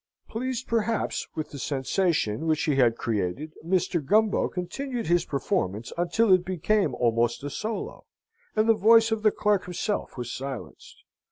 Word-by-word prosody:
Pleased, 255 +2 -3
perhaps, 230 -1 -1
with 155 -1 -4
the 140 - -7
sensation 145 - 0
which 155 -1 +1
he 150 - +1
had 120 -3 +4
created, 115 - -2
Mr. 170 -2 0
Gumbo 215 +7 +3
continued 235 +7 -4
his 175 +1 +2
performance 130 - -2
until 185 +5 +3
it 185 -1 +4
became 190 +3 0
almost 120 +1 +1
a 145 - -4
solo, 220 0 -5 0.5
and 215 0 +2
the 225 - +7
voice 225 +1 +5
of 220 -1 0
the 215 - +5
clerk 205 -2 +1
himself 180 +1 -3
was 120 -1 -4
silenced. 135 -2 -8
180 Hz, 155 wpm, -26 LUFS, 135-215 Hz, 0.5 s, the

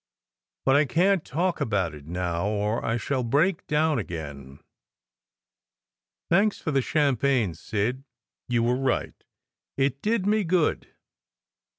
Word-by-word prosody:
"But 135 - +4
I 150 +1 +5
can 185 +8 +3
t - - -24
talk 175 +6 -1
about 100 -7 0
it 75 -1 -12
now, 85 +1 -2
or 105 +2 -1
I 115 - 0
shall 130 +3 -1
break 155 +10 +1
down 150 -2 +2
again. 70 - -7 1.7
Thanks 200 +4 +3
for 160 - -3
the 135 -2 +2
champagne, 135 - +1
Sid. 110 - -2 0.4
You 120 -1 +1
were 120 +2 +2
right; 130 -2 -1 0.6
it 135 0 0
did 215 -2 0
me 210 +1 +2
good. 170 -2 +1
130 Hz, 130 wpm, -26 LUFS, 105-155 Hz, 1.7 s, I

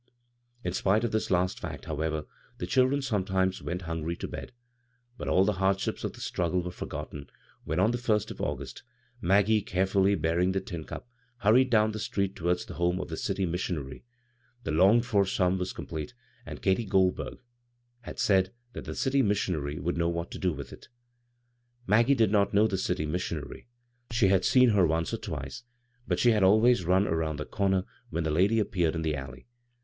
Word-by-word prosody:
In 90 - -2
spite 100 +4 +2
of 120 - 0
this 110 - -1
last 90 0 +1
fact, - - -7
however, 80 0 -2 0.3
the - - -3
children 135 +2 +2
sometimes 95 -5 0
went 90 +1 -4
hungry 80 0 -3
to - - -5
bed. - - -7 0.6
But - - -7
all 95 - +4
the 105 - +2
hardships 95 0 0
of - - -3
the - - -12
struggle 90 0 -1
were 90 - -4
forgotten 75 -4 -7 0.4
when, 80 +3 -1
on 105 +5 +4
the 120 - -2
first 110 -3 0
of - - -8
August, 70 -3 -4 0.4
Maggie, 105 +4 +3
carefully 95 +1 +2
bearing 90 +2 +1
the 95 - +1
tin 85 -5 -7
cup, - - -8 0.3
hurried 120 +5 +5
down 110 -2 +3
the 110 - -5
street 100 -2 -2
towards 90 +1 -1
the - - -9
home 90 +1 0
of - - -5
the - - -4
city 95 - -1
missionary. 85 -6 -4 0.6
The - - -2
longed 100 +9 +5
for 100 -4 +3
sum 95 -1 +1
was 90 0 -2
com - - -7
plete, 80 +7 -6 0.3
and - - -8
Katy 95 +4 +2
Goldburg 95 -2 +1 0.6
had 120 - -9
s^d 95 -2 +3 0.2
that - - -7
the - - -5
dty 135 0 +1
niissionary 90 - -1
would 85 - -2
know 85 0 +1
what 85 0 -3
to - - -7
do 90 - +1
with - - -7
it. - - -13 1.0
Maggie 115 +7 +4
did 110 -5 +3
not 100 -1 +2
know 105 +2 +5
the 105 -3 0
dty 90 -3 -1
missitmary. 80 - -4 0.4
She 115 -4 +3
had 95 -1 +3
seen 125 -1 +5
her 100 -5 +4
once 80 +1 -1
or - - 0
twice, - - -6 0.5
but - - +1
she 120 - +4
had 105 -2 +2
always 110 +1 +5
run 95 +3 +3
around 80 -1 -1
the 75 - -4
comer 95 -2 0 0.2
when 85 +1 -2
the 80 - -1
lady 95 +8 +3
appeared 90 -6 +1
in 80 - -2
the 80 -1 0
Alley. 65 -2 -8
95 Hz, 195 wpm, -28 LUFS, 85-105 Hz, 1.0 s, hurried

